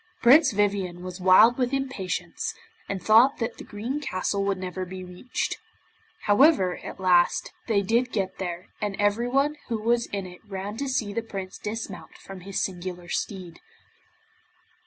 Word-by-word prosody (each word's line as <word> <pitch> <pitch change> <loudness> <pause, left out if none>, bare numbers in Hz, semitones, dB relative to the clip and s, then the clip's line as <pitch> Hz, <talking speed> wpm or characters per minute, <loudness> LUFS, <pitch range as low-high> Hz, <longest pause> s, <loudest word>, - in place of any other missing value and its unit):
Prince 270 +4 +7
Vivien 195 -4 0
was 185 0 -7
wild 215 +7 +6
with 250 -1 +1
impatience, 265 -9 -3 0.3
and 190 -3 -3
thought 235 +7 +6
that 230 0 -3
the - - -7
Green 230 +7 -4
Castle 200 -5 -1
would 200 -1 0
never 185 0 -4
be 185 0 -7
reached. 180 +7 -4 0.6
However, 205 - +4
at - - -9
last, 180 -2 +3 0.2
they 205 -4 +2
did 235 +5 +1
get 195 -3 -2
there, 175 -1 -5
and 205 -2 -1
everyone 245 +8 +1
who 230 - -1
was 235 +2 +1
in 200 -1 -4
it 180 -1 -11
ran 200 0 -5
to 280 +1 -2
see 220 -6 -1
the 230 - -1
Prince 195 -4 -7
dismount 210 -3 -6
from 195 -1 -10
his 195 +2 -3
singular 180 -1 -5
steed. 180 -4 -4
200 Hz, 155 wpm, -26 LUFS, 185-235 Hz, 0.6 s, Prince